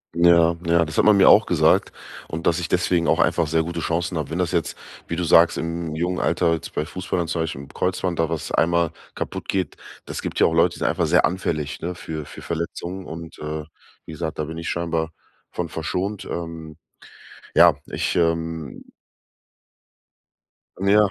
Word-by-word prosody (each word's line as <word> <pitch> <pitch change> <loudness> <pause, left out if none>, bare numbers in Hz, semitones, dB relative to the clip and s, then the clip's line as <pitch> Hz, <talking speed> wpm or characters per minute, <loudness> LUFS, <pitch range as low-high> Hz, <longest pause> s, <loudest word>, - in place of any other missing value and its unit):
Ja, 85 -1 +5
ja, 85 0 +3
das 80 - -7
hat - - +5
man 105 -1 +6
mir 95 - +6
auch - - +7
gesagt - - +3 0.4
und 80 +1 -3
dass 85 0 +3
ich 85 - -4
deswegen 85 -1 +1
auch - - +3
einfach 85 - +3
sehr 80 +1 +1
gute 85 0 -4
Chancen 85 +1 -1
habe. 75 -4 -3
Wenn 80 +3 -3
das 90 -1 0
jetzt, 85 -3 -1 0.3
wie 85 - -3
du 90 - -1
sagst, 85 0 +5
im 85 -1 -3
jungen 90 +3 -1
Alter 85 -2 +2
jetzt 80 - -5
bei 75 - -1
Fußballern 90 0 -3
zum 85 0 -1
Beispiel 80 -4 -3
im 70 - -11
Kreuzband, 90 +1 -2
da 80 -1 +1
was 80 -3 -4
einmal 85 0 +2 0.2
kaputt - - -5
geht, 95 -5 -1 0.3
das - - -5
gibt - - -4
ja - - +6
auch 80 - -1
Leute, 85 +1 +3
die - - -11
sind - - 0
einfach - - +1
sehr - - +4
anfällig, 75 -5 -2
ne? 90 +2 -3
Für 80 -3 -6
für - - -11
Verletzungen. 85 +3 -4
Und, 80 +1 -8
äh, 75 0 -4 0.4
wie 80 - -8
gesagt, 80 +1 -4
da 75 - 0
bin 80 +2 -7
ich 85 - -4
scheinbar 85 -1 -1 0.4
von 90 - -3
verschont. 90 +6 -3
Ähm, 80 -2 -6 0.8
ja, - - +7
ich, - - -2
ähm 80 -2 -1 2.0
ja, 105 +1 +5
85 Hz, 195 wpm, -23 LUFS, 80-85 Hz, 2.0 s, auch